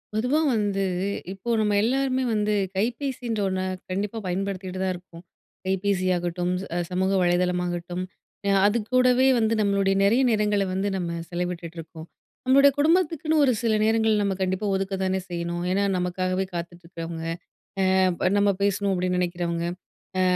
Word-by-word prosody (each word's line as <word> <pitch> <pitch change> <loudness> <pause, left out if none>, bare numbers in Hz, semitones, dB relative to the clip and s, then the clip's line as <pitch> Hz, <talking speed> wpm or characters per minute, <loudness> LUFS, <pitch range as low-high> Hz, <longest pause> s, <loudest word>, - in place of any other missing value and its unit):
பொதுவா 250 +7 +2 0.2
வந்து, 200 -2 0 0.5
இப்போ 195 +5 -7
நம்ம 210 -1 +2
எல்லாருமே 260 +3 +1
வந்து 210 0 +1 0.2
கைபேசின்ற 235 +1 -2
ஒண்ண 185 0 -1 0.3
கண்டிப்பா 200 +4 -2
பயன்படுத்திட்டு 185 0 -3
தான் 190 0 +1
இருப்போம். 175 -1 -13 0.4
கைபேசியாகட்டும், 180 -2 0
ச - - -6 0.2
சமூக 185 +1 0
வலைதளமாகட்டும், 180 0 0 0.4
அ - - +3 0.2
அதுக்கூடவே 250 +4 +3
வந்து 220 0 +2
நம்மளுடைய 200 -1 +2
நெறைய 225 +6 +4
நேரங்கள 210 -2 +2
வந்து 195 +2 0
நம்ம 170 -2 -3
செலவிட்டுட்ருக்கோம். 170 -2 -5 0.4
நம்மளுடைய 275 +2 +6
குடும்பத்துக்குன்னு 320 -1 +2
ஒரு 260 - +4
சில 230 -2 +1
நேரங்கள் 220 -1 +3
நம்ம 195 -1 0
கண்டிப்பா 190 +2 -1
ஒதுக்க 195 0 -2
தானே 190 0 0
செய்யணும். 170 0 -3
ஏன்னா, 200 +2 +2
நமக்காகவே 185 +1 -1
காத்துட்டு 175 +1 -6
இருக்றவங்க, 165 -1 -6 0.8
அ - - +4 0.2
ப 185 - +2
நம்ம 200 0 +4
பேசணும் 200 0 +1
அப்டின்னு 180 0 0
நெனைக்கிறவங்க. 170 -1 -2 0.5
அ - - +3
190 Hz, 135 wpm, -25 LUFS, 180-220 Hz, 0.8 s, நம்மளுடைய